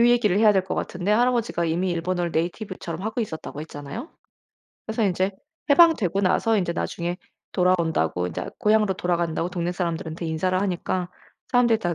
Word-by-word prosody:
요 235 - +6
얘기를 210 -5 +3
해야 215 -1 +6
될 190 -2 +2
것 190 - -3
같은데 185 +3 -2
할아버지가 235 -5 +2
이미 175 +3 0
일본어를 175 0 -1
네이티브처럼 175 0 -3
하고 220 +3 -2
있었다고 160 -7 -5
했잖아요. 145 - -7 0.8
그래서 220 0 0
인제 190 +1 +1 0.4
해방되고 280 - +5
나서 215 +4 +3
인제 175 -3 0
나중에 175 +1 -3 0.3
돌아온다고 170 - +1
인자 85 - -4
고향으로 210 -2 +3
돌아간다고 175 -2 -1
동네 175 -1 -2
사람들한테 170 -2 -3
인사를 185 +4 0
하니까 185 -1 -1 0.4
사람들이 235 -3 +4
다 175 -5 -1
185 Hz, 440 characters per minute, -24 LUFS, 170-210 Hz, 0.8 s, 요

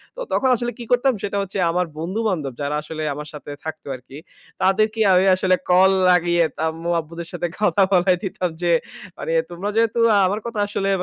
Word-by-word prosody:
তো - - -10
তখন 265 - +2
আসলে 240 +1 -3
কি 240 - -5
করতাম 250 +2 +3
সেটা 200 0 -2
হচ্ছে 195 0 -5
আমার 180 +1 0
বন্ধু 180 +7 -3
বান্ধব 150 -9 -3
যারা 145 +1 -1
আসলে 155 +1 -6
আমার 150 +1 -7
সাথে 145 0 -9
থাকতো 160 -2 -7
আরকি। 130 +2 -12 0.4
তাদেরকে 215 +3 +2
আমি 185 +1 +4
আসলে 185 0 +2
কল 185 +2 +6 0.2
লাগিয়ে 175 -1 +3 0.2
আম্মু 165 +2 -4
আব্বুদের 165 +1 -8
সাথে 175 - -3
কথা 210 -1 +3
বলায় 180 0 +4
দিতাম 185 -2 -2
যে 175 - +2 0.5
মানে - - -4 0.2
তোমরা 180 +4 -4
যেহেতু 230 0 +2 0.3
আমার 205 +3 -1
কথা 230 -3 -4
আসলে 195 -1 -2
180 Hz, 185 wpm, -21 LUFS, 165-205 Hz, 0.5 s, কল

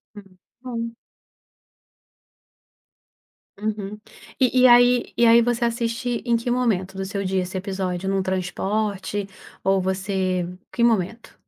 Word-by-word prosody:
Hum, 195 -3 -14 0.2
bom. 230 -2 -5 2.6
Uhum, 210 -1 -4 0.4
e 255 0 +3
e 255 - +8
aí 245 0 +5
e 235 - +5
aí 230 +1 +7
você 240 0 +1
assiste 235 +1 -2
em 235 -1 +2
que 235 +1 -2
momento 200 -7 0
do 195 - -3
seu 200 +1 -3
dia 190 0 0
esse 185 +1 -4
episódio, 190 -1 -3
num 195 0 +1
transporte, 195 +2 -2 0.4
ou 195 0 +2
você 190 -1 -1 0.2
que 235 - 0
momento? 225 -1 0
205 Hz, 125 wpm, -23 LUFS, 190-235 Hz, 2.6 s, e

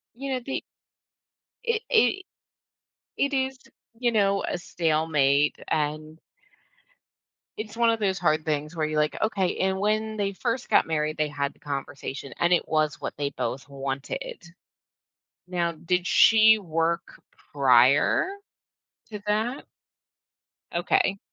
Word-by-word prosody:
You 270 +1 -4
know, 255 - -2
the 270 - -3 1.0
It 465 -2 0
it 385 - +3 0.9
it 280 0 0
is, 265 0 -1 0.4
you 240 -1 +1
know, 200 -2 +2
a - - -2
stalemate, 155 -4 +1
and 155 0 -2 1.4
it's 215 +1 -6
one 235 -1 +4
of 225 - -1
those 195 -2 0
hard 155 -3 +1
things 150 +1 -2
where 155 -2 0
you're 155 0 -2
like, 150 0 +1
"Okay," 195 -4 0
and 190 0 0
when 215 +2 0
they 200 -1 -1
first 235 +5 -3
got - - +4
married, 155 -1 -1
they 155 -1 +1
had 140 -1 -2
the - - -28
conversation, 140 -1 -6
and 175 +1 +2
it 175 - +3
was 155 -1 0
what - - -4
they 145 -1 -2
both 135 0 -4
wanted. 135 +2 -5 1.1
Now 175 -2 -1
did 180 +3 -1
she 220 +2 +6
work 165 -2 -2 0.3
prior 130 - +4 0.8
to 210 -2 -6
that? 220 +6 -1 1.1
Okay. 180 +3 +1
170 Hz, 130 wpm, -26 LUFS, 150-215 Hz, 1.4 s, she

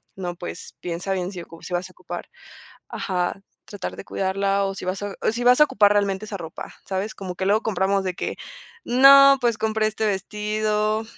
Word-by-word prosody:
no, 180 -2 -5
pues, 175 - -8
piensa 175 +2 -4
bien 185 0 -2
si 180 - -6
ocu 165 0 -13
si - - -7
vas 175 +1 -2
a - - -16
ocupar - - -8 0.6
ajá, 185 0 -2 0.2
tratar 205 - -6
de - - -8
cuidarla 195 +1 0
o 195 0 -2
si - - -7
vas 185 +2 -3
a 205 -1 -4
o - - +1
si 235 +2 -3
vas 250 +3 +5
a - - +10
ocupar 205 -7 +4
realmente 200 0 0
esa 210 -1 -5
ropa, 165 -3 -8
¿sabes? 195 +3 -3
Como 185 -2 -6
que 190 +1 -3
luego 215 +3 +3
compramos 195 -1 0
de 185 -1 -2
que: - - -4 0.5
"No, 275 +2 +8
pues, 235 -3 +1
compré 220 0 0
este 215 0 -2
vestido 210 +2 -1
200 Hz, 205 wpm, -23 LUFS, 190-215 Hz, 0.6 s, a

